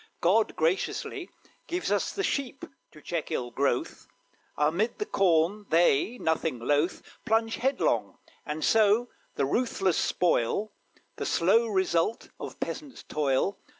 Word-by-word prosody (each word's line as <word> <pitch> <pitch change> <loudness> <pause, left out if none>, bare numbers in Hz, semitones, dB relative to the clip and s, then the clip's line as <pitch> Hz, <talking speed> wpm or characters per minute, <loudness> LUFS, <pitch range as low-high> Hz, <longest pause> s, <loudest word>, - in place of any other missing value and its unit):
God 210 +6 +2
graciously 190 - -1 0.4
Gives 355 +1 -2
us - - +1
the 395 - -3
sheep 275 -5 -2 0.3
to 150 - -16
check 170 -3 -3
ill 120 -1 -3
growth; 135 -2 -1 0.5
Amid 170 +10 +1
the 420 - -2
corn 195 - +2
they, 170 - +3
nothing 160 - 0
loath, 145 +8 0 0.2
Plunge 225 +1 +1
headlong, 270 +3 0 0.3
and 150 +1 -3
so, 220 +2 +4 0.3
ruthless, 190 - +1
spoil 180 - +1 0.5
The - - -3
slow 225 +7 +3
result 190 0 0
of - - -8
peasants' 285 -4 -6
toil. 150 +6 0
190 Hz, 120 wpm, -28 LUFS, 155-225 Hz, 0.5 s, so